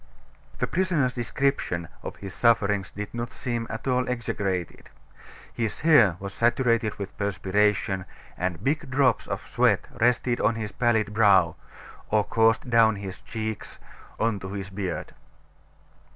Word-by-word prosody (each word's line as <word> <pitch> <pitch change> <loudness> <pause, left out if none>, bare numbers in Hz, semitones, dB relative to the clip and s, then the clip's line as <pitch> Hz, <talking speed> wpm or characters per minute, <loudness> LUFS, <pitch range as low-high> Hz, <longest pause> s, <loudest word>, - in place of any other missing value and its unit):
The - - 0
prisoner's 165 -8 +1
description 120 - -1
of - - -6
his 100 -1 -8
sufferings 105 -5 +2
did 105 +1 -7
not 120 0 -3
seem 120 -2 -3
at 115 +4 -6
all 125 -1 +1
exaggerated. 100 -7 -3 0.6
His 115 -3 -3
hair 120 - +5
was 100 0 -6
saturated 115 -2 +2
with 100 -1 -6
perspiration, 100 -1 +1 0.3
and 90 -1 -3
big 145 +1 0
drops 130 -2 +2
of - - -4
sweat - - +2
rested 120 +1 +1
on 110 +2 +2
his 110 -2 -4
pallid 110 -4 +1
brow, 105 -3 +4 0.5
or 105 -1 +3
coursed 115 +2 +2
down 115 -2 +4
his 95 -2 -7
cheeks 110 -1 -5 0.4
on 110 -3 +1
to 95 +1 -7
his 100 -1 -5
beard. 95 -3 -4
110 Hz, 135 wpm, -26 LUFS, 100-120 Hz, 0.6 s, hair